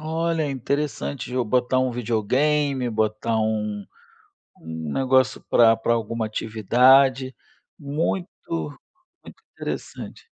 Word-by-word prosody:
Olha, 160 Hz, +1 st, -1 dB
é 145 Hz, -, -2 dB
interessante, 140 Hz, 0 st, -3 dB
de 125 Hz, -, -7 dB
eu 125 Hz, -1 st, +1 dB
botar 125 Hz, +3 st, +1 dB
um 130 Hz, 0 st, +1 dB
videogame, 125 Hz, +4 st, 0 dB
botar 110 Hz, 0 st, -1 dB
um 105 Hz, -2 st, -2 dB, 0.7 s
um 80 Hz, -1 st, -6 dB
negócio 130 Hz, 0 st, +2 dB
pra 115 Hz, -1 st, +6 dB
pra 115 Hz, +1 st, 0 dB
alguma 115 Hz, 0 st, -2 dB
atividade. 125 Hz, +5 st, +3 dB, 0.4 s
Muito 155 Hz, +5 st, -2 dB, 1.0 s
muito -, -, -15 dB
interessante. -, -, -7 dB
125 Hz, 110 wpm, -23 LUFS, 110-140 Hz, 1.0 s, pra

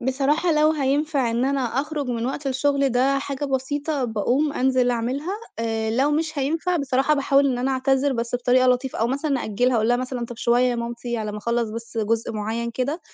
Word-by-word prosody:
بصراحة 280 Hz, +7 st, +1 dB
لو 305 Hz, 0 st, +4 dB
هينفع 285 Hz, -2 st, 0 dB
إن 235 Hz, +2 st, 0 dB
أنا 275 Hz, 0 st, 0 dB
أخرج 280 Hz, +4 st, -2 dB
من 235 Hz, -1 st, -2 dB
وقت 275 Hz, +2 st, -4 dB
الشُّغل 275 Hz, +1 st, +1 dB
ده 265 Hz, +2 st, +2 dB
حاجة 275 Hz, 0 st, -4 dB
بسيطة 280 Hz, +1 st, -1 dB
باقوم 245 Hz, +7 st, 0 dB
أنزِل 255 Hz, -2 st, +2 dB
أعملها، 260 Hz, +9 st, -2 dB, 0.3 s
آآ 225 Hz, -1 st, -1 dB
لو 265 Hz, +6 st, +2 dB
مش 310 Hz, 0 st, -1 dB
هينفع 325 Hz, +6 st, 0 dB
بصراحة 275 Hz, 0 st, +1 dB
باحاول 280 Hz, 0 st, +3 dB
إن 245 Hz, -, -2 dB
أنا 260 Hz, +2 st, 0 dB
أعتذِر 270 Hz, +1 st, +1 dB
بس 235 Hz, 0 st, -3 dB
بطريقة 250 Hz, +1 st, +3 dB
لطيفة، 250 Hz, +1 st, +1 dB
أو 225 Hz, -, +2 dB
مثلًا 275 Hz, 0 st, -1 dB
أأجّلها 245 Hz, +4 st, +1 dB
أقول 220 Hz, +1 st, +1 dB
لها 245 Hz, -, +4 dB
مثلًا: 255 Hz, -1 st, -3 dB
"طَب 240 Hz, -, -9 dB
شوية 240 Hz, +2 st, +2 dB
يا 250 Hz, -1 st, +1 dB
مامتي 235 Hz, 0 st, -4 dB
على 215 Hz, -2 st, -3 dB
ما 210 Hz, -, -5 dB
اخلّص 235 Hz, +1 st, -1 dB
بس 230 Hz, +1 st, -7 dB
جُزء 225 Hz, +1 st, 0 dB
مُعّين 225 Hz, +2 st, -3 dB
كده، 275 Hz, +8 st, -2 dB
260 Hz, 200 wpm, -23 LUFS, 235-280 Hz, 0.3 s, لو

